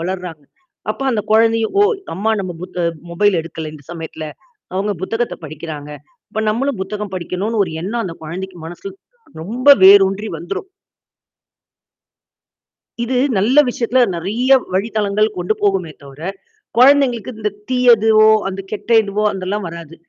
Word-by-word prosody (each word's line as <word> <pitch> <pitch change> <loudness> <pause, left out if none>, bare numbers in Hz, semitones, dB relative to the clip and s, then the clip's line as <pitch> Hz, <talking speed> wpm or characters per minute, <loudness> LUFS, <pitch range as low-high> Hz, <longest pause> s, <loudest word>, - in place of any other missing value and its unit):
வளருறாங்க. 180 -3 -5 0.5
அப்ப - - -17
அந்த 215 - 0
குழந்தைங்க, 225 0 +3
ஓ! - - +6 0.3
அம்மா 215 +4 0
நம்ம 180 -3 -5
புத் 180 - -8
அ - - +2 0.2
மொபைல் 190 +1 +2
எடுக்கல 160 -1 -7
இந்த 145 - -14
சமயத்தில, 160 -1 -7 0.5
அவங்க 200 +2 0
புத்தகத்த 225 +5 -2
படிக்கிறாங்க. 150 -1 -7 0.4
அப்ப 220 - -3
நம்மளும் 240 -1 -1
புத்தகம் 205 0 -5
படிக்கனும்னு 195 +5 -1
ஒரு 165 - -7
எண்ணம், 230 +6 -2
அந்த 165 -3 -6
குழந்தைக்கு 180 +3 -6
மனசுல, 175 - -8 0.5
ரொம்ப 245 - -2 0.2
வேரூன்றி 195 +2 +6
வந்துரும். 195 - -6 2.4
இது 250 +1 -1 0.2
நல்ல 230 +9 +2
விஷயத்துல 245 +1 +1
நிறைய 220 +10 -1 0.2
வழி 195 +5 0
தளங்கள் 210 0 +2
கொண்டு 180 +4 0
போகுமே 195 -5 +1
தவிர, 140 +2 -13 0.6
குழந்தைகளுக்கு 255 -2 +4
இந்த 210 -1 -1 0.2
தீயதுவோ, 225 -4 +5 0.2
அந்த 195 0 -4
கெட்ட 215 - -6
இதுவோ 205 +1 -2
அதெல்லாம் 195 +1 -3
வராது. 165 -1 -9
200 Hz, 135 wpm, -18 LUFS, 175-225 Hz, 2.4 s, ஓ